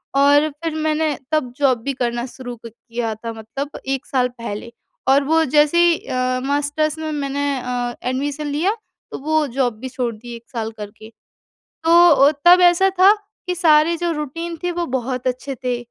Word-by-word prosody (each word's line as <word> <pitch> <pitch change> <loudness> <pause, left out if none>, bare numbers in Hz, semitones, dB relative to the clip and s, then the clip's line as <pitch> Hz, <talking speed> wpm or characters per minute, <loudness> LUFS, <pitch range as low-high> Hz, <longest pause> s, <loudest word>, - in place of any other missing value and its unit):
और 285 +2 +5
फिर 325 -1 -2
मैंने 310 -2 0
तब 305 -6 0
जॉब 270 -3 +3
भी 275 +2 -2
करना 240 -1 -2
शुरू 250 -1 -8
क - - -4
किया 230 0 -5
था 230 +2 -6
मतलब 225 +6 -7
1 270 -1 -2
साल 255 -2 +1
पहले, 230 0 -6 0.4
और 275 +2 +4
वो 320 +3 +3
जैसे 295 +3 +4
ही 340 -1 +3
अ, 255 0 -1
मास्टर्स 290 +2 0
में 315 0 -4
मैंने 285 -1 -2
अ, 245 -1 -3
एडमिशन 290 +3 -3
लिया, 320 +9 0 0.4
तो - - -5
वो 310 +2 +1
जॉब 245 -3 -1
भी 260 +2 -6
छोड़ 250 -2 -3
दी 235 +2 -9
1 235 - -12
साल 225 -3 -4
करके। 210 +1 -10 0.7
तो 325 - +2 0.2
अ, 285 -1 +6
तब 355 +1 +8
ऐसा 355 +2 +5
था, 385 +2 +8 0.4
कि 360 - -1
सारे 325 -1 +4
जो 345 0 -1
रूटीन 330 +3 -4
थी, 355 - 0
वो 345 0 -2
बहुत 255 -1 -3
अच्छे 255 +2 -3
थे। 250 -1 0
275 Hz, 185 wpm, -20 LUFS, 245-310 Hz, 0.7 s, तब